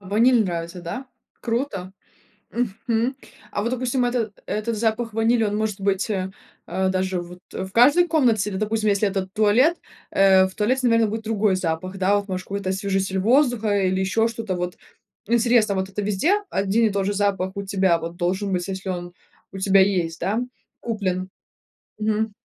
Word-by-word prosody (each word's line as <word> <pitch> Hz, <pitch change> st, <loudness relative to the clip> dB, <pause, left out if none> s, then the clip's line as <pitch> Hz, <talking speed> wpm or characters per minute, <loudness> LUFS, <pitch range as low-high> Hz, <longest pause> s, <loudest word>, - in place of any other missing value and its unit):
Ваниль 220 Hz, +4 st, +3 dB
нравится, 170 Hz, 0 st, -4 dB
да? 250 Hz, +11 st, -5 dB, 0.4 s
Круто. 230 Hz, -6 st, -3 dB, 0.6 s
Мгм. 235 Hz, +2 st, -1 dB, 0.4 s
А 205 Hz, -, -2 dB
вот, 235 Hz, -, -1 dB
допустим, 255 Hz, 0 st, 0 dB
это 240 Hz, -3 st, -1 dB
этот 215 Hz, +1 st, -2 dB
запах 225 Hz, 0 st, -1 dB
ванили, 225 Hz, +1 st, +2 dB
он 210 Hz, 0 st, 0 dB
может 215 Hz, -2 st, -2 dB
быть, 195 Hz, +2 st, 0 dB
э, 190 Hz, -2 st, -2 dB, 0.4 s
а, 190 Hz, +2 st, 0 dB
даже 185 Hz, -1 st, -1 dB
вот 180 Hz, +1 st, -11 dB
в 190 Hz, 0 st, -5 dB
каждой 290 Hz, +10 st, +5 dB
комнате, 235 Hz, -, +2 dB
или, 190 Hz, -, -4 dB
допустим, 215 Hz, +1 st, 0 dB
если 200 Hz, +1 st, +2 dB
этот 190 Hz, -1 st, -3 dB
туалет, 230 Hz, +10 st, +4 dB, 0.3 s
э, 190 Hz, -1 st, +5 dB
в 190 Hz, -, -13 dB
туалете, 255 Hz, +5 st, +1 dB
наверно, 230 Hz, -1 st, +4 dB
будет 220 Hz, +1 st, -4 dB
другой 215 Hz, -3 st, +1 dB
запах, 185 Hz, +1 st, -3 dB
да. 195 Hz, +2 st, +2 dB
Вот, 205 Hz, 0 st, -4 dB
может, 185 Hz, -1 st, -3 dB
какой-то 200 Hz, -1 st, -3 dB
освежитель 190 Hz, 0 st, -1 dB
воздуха 225 Hz, -2 st, +3 dB
или 190 Hz, +1 st, 0 dB
еще 225 Hz, +4 st, +2 dB
что-то, 225 Hz, -5 st, -4 dB
вот 180 Hz, 0 st, -4 dB, 0.5 s
интересно, 235 Hz, -3 st, +3 dB
вот 190 Hz, 0 st, -2 dB
это 200 Hz, +2 st, -4 dB
везде 210 Hz, -, +1 dB, 0.2 s
один 200 Hz, +4 st, +1 dB
и 220 Hz, -, +3 dB
тот 195 Hz, -1 st, -1 dB
же 205 Hz, -, 0 dB
запах 195 Hz, -2 st, 0 dB
у 200 Hz, -, -2 dB
тебя 190 Hz, -3 st, +2 dB
вот 170 Hz, +1 st, -6 dB
должен 190 Hz, +3 st, -1 dB
быть, 180 Hz, +1 st, -1 dB
если 190 Hz, 0 st, -5 dB
он 175 Hz, -1 st, -4 dB, 0.4 s
у 195 Hz, -, -8 dB
тебя 195 Hz, 0 st, +4 dB
есть, 180 Hz, -4 st, +1 dB
да, 200 Hz, +6 st, 0 dB, 0.4 s
куплен? 190 Hz, -5 st, -2 dB, 0.7 s
Мгм. 215 Hz, 0 st, -1 dB
200 Hz, 175 wpm, -23 LUFS, 190-225 Hz, 0.7 s, каждой